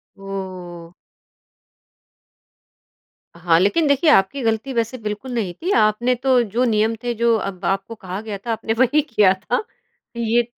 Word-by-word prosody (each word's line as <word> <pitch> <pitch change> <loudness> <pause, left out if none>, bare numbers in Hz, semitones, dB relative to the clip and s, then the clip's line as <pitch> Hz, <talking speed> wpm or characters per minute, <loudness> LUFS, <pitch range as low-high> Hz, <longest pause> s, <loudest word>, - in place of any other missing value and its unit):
ओह! 185 -3 -8 2.4
हाँ, 170 -1 +2
लेकिन 290 - +2
देखिए 280 +3 +3
आपकी 265 +3 +3
गलती 225 +3 -1
वैसे 235 +2 -1
बिल्कुल 215 +3 -5
नहीं 200 -7 -2
थी। 350 - -4
आपने 225 +4 +2
तो 255 0 +2
जो 230 +4 -1
नियम 220 0 +1
थे 240 0 -1
जो 235 0 +2
अब 195 -2 -5
आपको 195 +4 -2
कहा 190 -1 -6
गया 215 -3 -6
था 230 - -2
आपने 225 0 -2
वही 260 +4 +4
किया 210 -9 +3
था। 195 - -2 0.5
ये 235 +1 +2
220 Hz, 150 wpm, -21 LUFS, 195-245 Hz, 2.4 s, वही